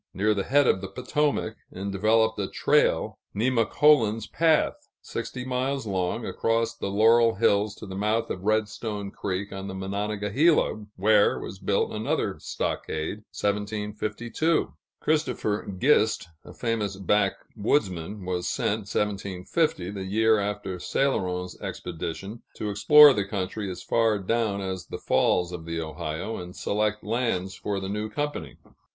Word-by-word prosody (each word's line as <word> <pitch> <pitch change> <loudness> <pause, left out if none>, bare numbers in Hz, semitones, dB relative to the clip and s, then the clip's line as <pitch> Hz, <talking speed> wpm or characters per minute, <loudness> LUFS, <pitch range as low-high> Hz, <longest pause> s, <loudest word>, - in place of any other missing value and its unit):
near 105 +3 +2
the 100 -2 -2
head 145 +1 +4
of 95 - +3
the 95 - -4
Potomac, 125 +1 -1
and 100 +2 -5
developed 110 +3 +2
a 100 - -1
trail - - +2 0.2
("Nemacolin's 115 0 +3
Path"), 160 -1 +1
sixty 125 0 -5
miles 130 +1 -1
long, 95 +3 -1
across 115 0 0
the - - -4
Laurel 115 +3 +5
Hills 105 -1 +2
to - - -9
the 95 - -8
mouth 105 +4 0
of 90 - -4
Redstone 105 -1 -1
Creek, 100 0 -4
on 95 0 -6
the 95 - -6
Monongahela, 105 - +1
where 105 +2 +4
was 95 - -7
built 100 0 0
another 110 +1 -1
stockade 80 +7 -3
(1752). 105 +8 -1 0.3
Christopher 125 -10 0
Gist, 110 - +3
a - - -12
famous 110 -4 -2
backwoodsman, 100 - 0
was 90 -1 -2
sent 105 -1 -1
(1750), 100 - -1
the 100 -2 -5
year 110 +3 +3
after 100 -2 -3
Céloron's 90 -8 -1
expedition, 90 +6 -5
to 105 - -3
explore 145 +8 +8
the 105 -4 0
country 100 +1 -3
as 90 - -7
far 115 -2 +2
down 100 0 0
as 95 -2 -4
the - - -5
falls 90 0 +2
of 85 -2 -7
the 85 0 -3
Ohio, 80 +6 -4
and 90 0 -8
select 105 +1 -1
lands 105 -5 -1
for 100 +1 -3
the 95 - -5
new 105 +2 -3
company. 145 - -4
105 Hz, 140 wpm, -26 LUFS, 95-115 Hz, 0.3 s, explore